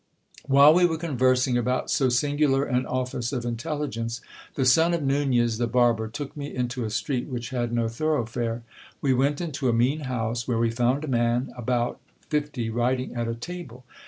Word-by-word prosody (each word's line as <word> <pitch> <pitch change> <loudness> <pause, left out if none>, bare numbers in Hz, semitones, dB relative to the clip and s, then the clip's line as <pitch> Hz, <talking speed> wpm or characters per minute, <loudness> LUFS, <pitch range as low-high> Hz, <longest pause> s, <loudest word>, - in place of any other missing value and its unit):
While 140 +2 +7
we 175 +1 +5
were 160 -1 -2
conversing 130 -5 +2
about 125 +1 -1
so 130 -2 +2
singular 145 +2 +2
an 125 -2 0
office 125 -2 -2
of 125 -4 -3
intelligence, 120 -1 -3 0.4
the 135 - 0
son 160 +7 +4
of 165 - -3
Nunez 130 -5 +1
the 120 - +1
barber 115 -2 +2
took 145 +6 -7
me 145 -1 -6
into 125 0 -2
a 110 - -2
street 125 +3 -2
which 120 0 -5
had 120 -2 -1
no 120 -1 +1
thoroughfare. 115 -3 -2 0.4
We 135 -2 +2
went 140 +4 +1
into 145 -6 -1
a - - +2
mean 125 +6 +2
house, 115 -1 -2
where 120 -3 0
we 115 0 +2
found 125 +5 +1
a - - -4
man 120 0 0
about 120 0 -1 0.3
fifty 145 -6 -1
writing 125 +2 0
at 120 -1 -2
a 115 - -2
table. 130 -3 -8
125 Hz, 185 wpm, -25 LUFS, 120-140 Hz, 0.4 s, While